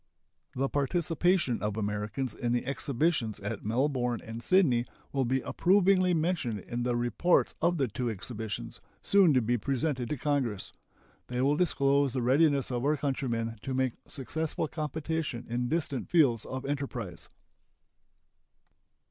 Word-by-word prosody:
The 135 +2 +1
participation 165 0 +1
of 105 0 -2
Americans 105 +5 -2
in 120 -2 -1
the 120 - 0
exhibitions 140 -5 0
at 105 - -4
Melbourne 125 +1 0
and 115 +1 -6
Sydney 130 -9 +3 0.2
will 135 -2 0
be 130 +2 +1
approvingly 185 +2 +3
mentioned 160 - 0
in 120 +5 -4
the 120 0 0
reports 120 +9 +2
of 170 +1 +2
the 135 -3 +1
two 120 +2 -3
exhibitions, 110 -1 -5 0.2
soon 195 -5 +5
to 125 - +3
be 120 +2 +1
presented 130 -1 -1
to 150 - -2
Congress. 130 -8 -1 0.6
They 125 0 -3
will 140 +3 +3
disclose 140 -5 +2
the 130 - -1
readiness 140 +1 +3
of 120 0 -2
our 150 +2 +2
countrymen 120 -5 -2
to 130 -1 -3
make 130 -2 +1
successful 155 +4 -3
competition 155 -4 -3
in 120 +1 -2
distant 150 -5 -1
fields 135 -10 +3
of 130 +1 -5
enterprise. 125 - -4
130 Hz, 140 wpm, -29 LUFS, 120-155 Hz, 0.6 s, soon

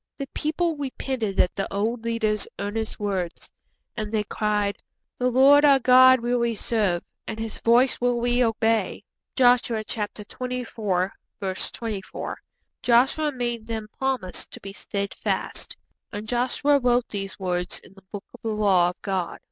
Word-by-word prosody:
The 275 - -3
people 320 +1 -1
repented 260 -7 -3
at 180 - +3
the 195 - -3
old 225 +4 -1
leader's 220 -2 0
earnest 215 +2 -3
words, 190 -4 -3 0.4
and 215 -2 -4
they 215 -2 +1
cried, 210 -1 -1 0.4
'The 250 0 +2
Lord 275 +4 +6
our 280 -2 +7
God 255 0 +7
will 240 +1 +1
we 235 -1 0
serve, 205 -6 0 0.2
and 220 - -4
His 225 -1 -5
voice 245 +3 +3
will 245 -1 +2
we 245 +1 +2
obey.' 225 -1 +1 0.3
(Joshua 245 -3 +3
xxiv. 210 -1 -5
24.) 225 -7 -2 1.7
Joshua 265 +6 +3
made 240 -4 -3
them 220 -2 -4
promise 260 -9 -1
to - - -11
be 195 0 -8
steadfast. 200 0 -3 0.3
'_And 210 0 -5
Joshua 255 +5 +2
wrote 245 -1 +2
these 195 -1 -5
words 180 -1 -1
in - - -15
the 195 - -17
Book 205 -1 -7
of - - -14
the - - -5
Law 200 -5 +3
of 180 - -9
God. 190 -3 -2
225 Hz, 150 wpm, -25 LUFS, 205-250 Hz, 1.7 s, our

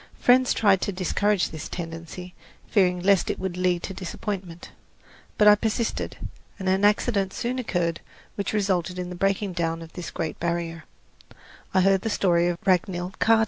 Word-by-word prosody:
Friends 255 +1 +5
tried 200 -4 +4
to - - -1
discourage 195 +1 0
this 155 -2 -7
tendency, 170 +1 -7 0.3
fearing 180 -4 +2
lest 195 0 +3
it - - -1
would 190 -2 -3
lead 180 -1 +1
to 195 - -4
disappointment. 185 -1 -6 0.7
But 210 - +5
I 210 - +10
persisted, 220 +2 -1 0.4
and 190 - -5
an 190 +1 +2
accident 205 -2 +2
soon 250 +2 -2
occurred 175 -8 -1 0.3
which 200 - -3
resulted 190 -4 0
in 180 -1 -4
the - - -5
breaking 195 +1 0
down 165 -1 -2
of 165 - -13
this 180 - -6
great 160 - -4
barrier 170 -1 -2 0.9
I 185 - +3
heard 195 0 +4
the 225 - -2
story 175 -4 +2
of 175 -1 -1
Ragnhild 185 0 0
Kaata. 225 0 +5
185 Hz, 170 wpm, -25 LUFS, 175-200 Hz, 0.9 s, I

